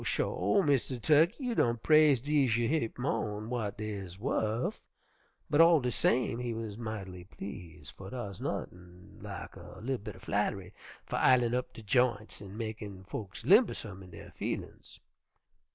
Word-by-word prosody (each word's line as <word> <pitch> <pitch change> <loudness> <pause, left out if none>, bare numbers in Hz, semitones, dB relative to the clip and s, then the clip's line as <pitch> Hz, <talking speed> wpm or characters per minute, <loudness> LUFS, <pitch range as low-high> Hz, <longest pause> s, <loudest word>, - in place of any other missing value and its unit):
sho! 200 - +1
Mistah 135 -4 +1
Tukkey, 155 +7 +4
you 250 -3 -1
done 120 - +2
praise 155 +2 +5
dese 140 -5 +2
yer 120 -1 +1
heap 145 -6 -1
mo'n 110 -4 -2
w'at 110 -4 -3
dey 110 0 -4
is 95 -3 -7
wuf,' 110 +2 -1 0.7
but 145 - +4
all 165 -1 +7
de 125 -2 -1
same 120 0 +1
he 120 -2 -3
wuz 110 -1 -4
might'ly 100 -5 -6
please', 90 -7 -9
fer 95 0 -9
dar's 100 -6 -6
nuttin' 90 0 -6
lak - - -7
a - - -11
li'l 130 +2 -2
bit 105 -1 -8
er - - -13
flatt'ry 100 -1 -2 0.3
fer - - -3
ilin' 120 -2 +4
up 125 0 -1
de 115 - -11
j'ints 115 -2 +1
an' 100 +1 -9
mekin' 105 -4 -6
folks 95 +1 -7
limbersome 170 - +3
in 90 - -12
der 85 -1 -11
feelin's. - - -5
110 Hz, 165 wpm, -31 LUFS, 100-130 Hz, 0.7 s, all